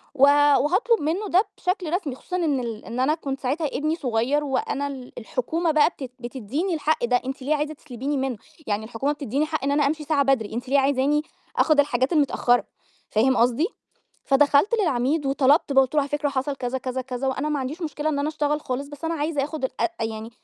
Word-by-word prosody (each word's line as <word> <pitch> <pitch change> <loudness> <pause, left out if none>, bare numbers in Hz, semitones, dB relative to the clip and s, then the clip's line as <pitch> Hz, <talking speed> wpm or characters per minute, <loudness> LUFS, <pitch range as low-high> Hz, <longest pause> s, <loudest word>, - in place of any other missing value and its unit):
و 270 - -6
وهاطلُب 290 - +4
منّه 345 +8 -1
ده 370 +4 +4
بشكل 360 -3 -2
رسمي، 300 -9 -1
خصوصا 360 - -7
إن 300 -6 +1
ال 230 -3 -5
أنا 260 +6 0
كنت 275 -4 -5
ساعتها 290 +5 -1
ابني 305 +3 -1
صغير 260 +1 0
وأنا 280 +1 -1
ال 260 -3 -8
الحكومة 315 +8 -1
بقى 305 0 +4
بت 265 -7 -9
بتدّيني 260 - -3
الحق 310 -4 +1
ده، 245 +1 +2
أنتِ 265 +1 -5
ليه 290 +4 +1
عايزة 300 +1 -2
تسلبيني 280 -1 -4
منّه؟ 265 -4 -2 0.3
يعني 210 0 -1
الحكومة 245 +5 -2
بتدّيني 285 0 -1
حق 310 -3 -3
إن 280 - +1
أنا 290 -1 +3
أمشي 305 +1 -2
ساعة 290 -2 +2
بدري، 255 -6 +1
أنتِ 245 +2 -4
ليه 280 +1 +4
عايزاني 280 +2 +2 0.4
آخُد 310 -2 +4
الحاجات 260 0 +2
المتأخّرة؟ 270 -5 +2 0.4
فاهم 255 +5 +3
قصدي، 245 +8 +3 0.6
فدخلت 285 - +4
للعميد 285 -1 +1
وطلبت 275 +2 +3
بقى 270 0 +6
قُلت 260 - -9
له: 300 - +4
"على 280 - -2
فكرة 295 0 0
حصل،" 275 0 -2
كذا، 250 +1 -2
كذا، 255 0 -3
كذا 255 +1 -4
"وأنا 270 +3 -1
ما 300 -1 0
عنديش 290 +7 -5
مشكلة 300 -1 -2
إن 290 -2 0
أنا 285 - 0
أشتغل 300 -1 -1
خالص، 275 +1 -4
بس 290 +2 -10
أنا 330 +1 0
عايزة 295 -2 -1
آخُد 305 -1 -5
الأ 260 - -2 0.2
أ - - 0
يعني 220 0 -5
280 Hz, 210 wpm, -24 LUFS, 255-305 Hz, 0.6 s, بقى